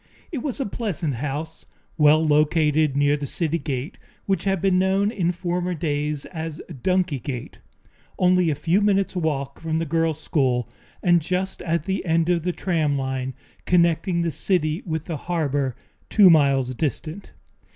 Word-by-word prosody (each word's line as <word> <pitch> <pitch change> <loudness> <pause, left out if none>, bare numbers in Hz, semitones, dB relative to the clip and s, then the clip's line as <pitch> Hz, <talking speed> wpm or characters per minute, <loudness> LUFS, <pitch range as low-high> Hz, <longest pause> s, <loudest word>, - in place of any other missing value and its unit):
It 305 - -3
was 265 +1 -4
a 270 - 0
pleasant 190 - -3
house, 145 +5 -5 0.3
well 155 +1 +5
located 150 -1 +3
near 145 0 +3
the 145 -1 -4
city 165 +1 -1
gate 140 +3 -4 0.3
which 195 0 -1
had 195 -1 +1
been 185 0 +2
known 195 +2 +2
in 180 -6 0
former 180 0 -2
days 150 -2 -2
as 160 -3 -6 0.2
Donkey 180 -5 +1
Gate, 125 -1 -6 0.6
only 180 -1 +3
a 150 - 0
few 175 +7 +1
minutes' 195 -2 +1
walk 140 -5 -2
from 160 -1 -1
the 165 - -1
girls' 165 0 0
school 130 -7 0 0.4
and 175 -2 +4
just 185 +4 -2
at 165 -2 -1
the 195 0 -1
end 165 -1 +1
of 175 -1 +2
the 180 +2 -1
tram 160 -6 0
line 130 -1 -3 0.3
connecting 170 0 +2
the 165 - 0
city 155 +1 0
with 160 -1 -3
the 165 - -4
harbor, 145 -6 -1 0.3
two 200 -5 +7
miles 135 -5 +3
distant. 155 +7 -4
160 Hz, 160 wpm, -23 LUFS, 145-180 Hz, 0.6 s, two